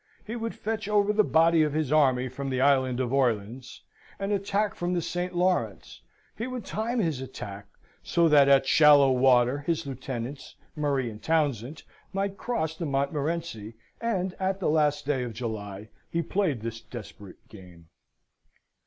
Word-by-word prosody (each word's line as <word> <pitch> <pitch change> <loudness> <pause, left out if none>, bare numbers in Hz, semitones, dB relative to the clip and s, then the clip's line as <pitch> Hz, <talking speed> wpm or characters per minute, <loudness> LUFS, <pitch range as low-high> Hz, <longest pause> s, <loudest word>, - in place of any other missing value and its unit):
He 220 - -5
would 230 -1 -4
fetch 220 -1 -3
over 210 0 +3
the 215 0 +4
body 165 -2 +4
of 150 -2 +1
his 155 -3 -1
army 130 -4 +3
from 135 +2 -5
the 130 -1 -1
Island 130 -2 +3
of 130 0 -1
Orleans, 120 -1 -1 0.3
and 195 +1 -3
attack 200 +1 0
from 175 +1 -2
the 175 - 0
St. 175 +2 -3
Lawrence. 180 +1 -1 0.3
He 230 - -4
would 255 -3 -6
time 230 +4 -2
his 160 - 0
attack, 100 -5 -8 0.3
so 170 -1 +2
that, 145 -3 +6
at 135 -1 +5
shallow 145 -1 +6
water, 125 +1 +4
his 160 +2 -2
lieutenants, 130 0 -6 0.2
Murray 140 -5 -1
and 105 0 -11
Townsend, 145 -4 -1 0.3
might 195 0 -1
cross 160 -9 -2
the 165 -1 -4
Montmorenci, 140 -4 -2 0.3
and, 190 -6 -1
at 190 0 -1
the 180 - +1
last 150 -2 +1
day 140 -3 0
of 120 -2 -4
July, 105 -3 -6 0.2
he 170 0 -1
played 165 - -1
this 115 0 -5
desperate 105 -5 -11
game. 90 -5 -15
145 Hz, 160 wpm, -27 LUFS, 125-180 Hz, 0.3 s, that